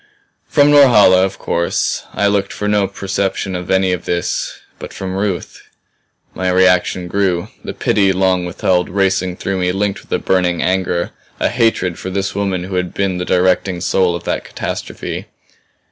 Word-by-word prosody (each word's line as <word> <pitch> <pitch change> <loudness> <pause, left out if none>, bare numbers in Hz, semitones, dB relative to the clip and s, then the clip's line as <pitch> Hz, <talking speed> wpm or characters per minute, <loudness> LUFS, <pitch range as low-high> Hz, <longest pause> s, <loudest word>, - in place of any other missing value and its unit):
From 145 -1 +4
Norhala, 105 -10 +6
of 95 0 -2
course, 85 0 -1
I 105 - 0
looked 100 -1 +1
for 105 - -4
no 105 -1 +2
perception 95 0 -2
of 90 0 -5
any 95 -1 +2
of 90 -1 -3
this. 85 0 -2 0.2
But - - -8
from 95 -1 -5
Ruth 95 -2 -3 0.7
My 95 +1 -1
reaction 90 -1 +2
grew; 90 -2 0
the - - -6
pity 100 -2 +2
long 95 -1 +1
withheld 90 0 0
racing 95 -1 0
through 95 0 -2
me 90 0 +1
linked 100 +1 -1
with - - -24
a - - +2
burning 90 -2 +1
anger, 90 -2 0 0.3
a - - +1
hatred 115 -7 +1
for 95 - -5
this 95 +1 -2
woman 95 -3 -1
who 95 0 -4
had 90 -1 -2
been 95 -2 -1
the 90 - -2
directing 90 0 +1
soul 90 -1 +1
of 85 - -6
that - - -2
catastrophe. - - -5
95 Hz, 170 wpm, -17 LUFS, 90-100 Hz, 0.7 s, Norhala